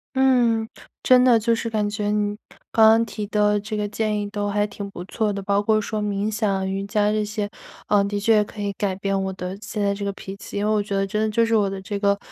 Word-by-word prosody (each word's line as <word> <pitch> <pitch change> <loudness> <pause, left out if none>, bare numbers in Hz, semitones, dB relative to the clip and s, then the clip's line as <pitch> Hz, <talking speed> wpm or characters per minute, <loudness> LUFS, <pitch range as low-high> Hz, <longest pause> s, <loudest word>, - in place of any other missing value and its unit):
嗯， 245 -4 +3 0.4
真 255 -1 +6
的， 245 -3 +6
就 230 +2 +1
是 230 0 -2
感 215 -2 0
觉 205 0 -2
你 210 0 0 0.4
刚 220 -1 +6
刚 225 +1 +4
提 210 -1 -5
的 210 0 +2
这 210 +1 -5
个 210 0 -1
建 215 0 -1
议 205 - -3
都 205 -1 -2
还 205 +1 +1
挺 200 -1 -7
不 180 -2 -8
错 215 +2 -1
的， 200 - -4
包 200 +1 +1
括 215 +1 +2
说 215 0 -3
冥 205 0 -1
想 200 -3 0
瑜 195 +1 -2
伽 210 0 +1
这 215 0 0
些。 210 0 -3 0.4
呃， 205 -1 +4
的 205 0 -2
确 210 0 +4
可 210 - -12
以 205 -1 -2
改 195 -1 -2
变 195 0 -1
我 190 - -2
的 185 0 -5
现 210 +1 -6
在 200 0 +2
这 200 0 -5
个 200 - -1
脾 195 0 -8
气， 200 - -8
因 205 - 0
为 215 - +2
我 215 -1 +2
觉 200 -1 -4
得 195 0 +1
真 210 +2 -2
的 220 - +1
就 230 +2 +2
是 230 0 +1
我 205 -2 +2
的 195 0 -5
这 200 0 -4
个 200 -1 +2
210 Hz, 290 characters per minute, -23 LUFS, 200-215 Hz, 0.4 s, 真